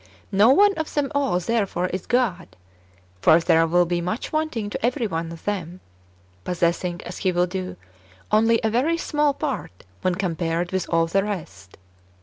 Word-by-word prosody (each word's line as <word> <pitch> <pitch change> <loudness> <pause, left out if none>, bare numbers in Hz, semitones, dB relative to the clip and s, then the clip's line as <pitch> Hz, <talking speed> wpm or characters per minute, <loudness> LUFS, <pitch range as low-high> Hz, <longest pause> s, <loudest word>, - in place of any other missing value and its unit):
No 205 +4 +5
one 400 +9 +6
of 315 - -3
them 290 -2 0
all, 275 -10 +1
therefore, 195 -2 -1
is 185 0 -5
God. 240 -7 0 0.7
For 160 - +6
there 165 0 +3
wdll 175 +1 +3
be 175 0 -1
[much] 200 +8 -3
wanting 285 -10 -1
to - - -5
every 245 +1 +1
one 165 -4 -3
of 165 - -11
them, 185 -3 -3 0.6
possessing 175 0 -1
[as 175 - -7
he 185 - +1
will 175 0 +2
do] 185 0 -5 0.5
only 225 +2 +4
a 220 - +1
very 285 +9 +1
small 295 -3 +1
part 270 - -4 0.2
when 185 - +1
compared 175 -2 -2
with 190 -1 -2
all 165 0 +3
the 195 +4 +1
rest. 100 - -7
190 Hz, 170 wpm, -23 LUFS, 175-235 Hz, 0.7 s, one